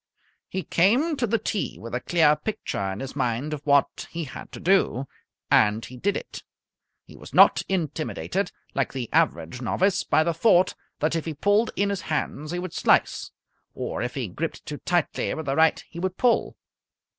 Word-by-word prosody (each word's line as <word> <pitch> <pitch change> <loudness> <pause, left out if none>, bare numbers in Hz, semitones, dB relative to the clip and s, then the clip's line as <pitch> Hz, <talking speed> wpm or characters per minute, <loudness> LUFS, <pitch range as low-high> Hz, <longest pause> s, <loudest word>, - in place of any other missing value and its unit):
He 190 - -3
came 250 - +3
to 240 - 0
the 230 +2 +2
tee 210 - -3
with 115 +4 -8
a 125 - 0
clear 155 +1 +3
picture 150 - -3
in 95 - -6
his 135 0 -6
mind 130 +2 -1
of 150 - -5
what 140 -1 +2
he 165 0 -4
had 140 - -9
to - - -8
do, 175 -8 +2 0.5
and 110 +1 +4
he 130 - -10
did 200 +11 0
it. - - -8 0.6
He - - -15
was - - -11
not - - +7
intimidated, 175 +2 -2 0.2
like 135 - -1
the 125 -4 -5
average 85 +11 +1
novice, 185 - +1
by 155 - +3
the 170 +1 0
thought 180 +1 +4 0.3
that 155 +2 +1
if 165 - -2
he 160 -2 -4
pulled 205 +8 +2
in 200 0 +1
his 200 - -3
hands 155 -1 -3
he 175 - -2
would 180 -1 -5
slice, - - +2 0.5
or - - -3
if 125 - -3
he 130 -5 -2
gripped 155 - -5
too 150 - -5
tightly 175 -2 0
with 160 - -5
the 135 0 0
right 160 0 +3
he 170 - -9
would 185 +1 -2
pull. 245 -2 +2
160 Hz, 190 wpm, -25 LUFS, 135-190 Hz, 0.6 s, not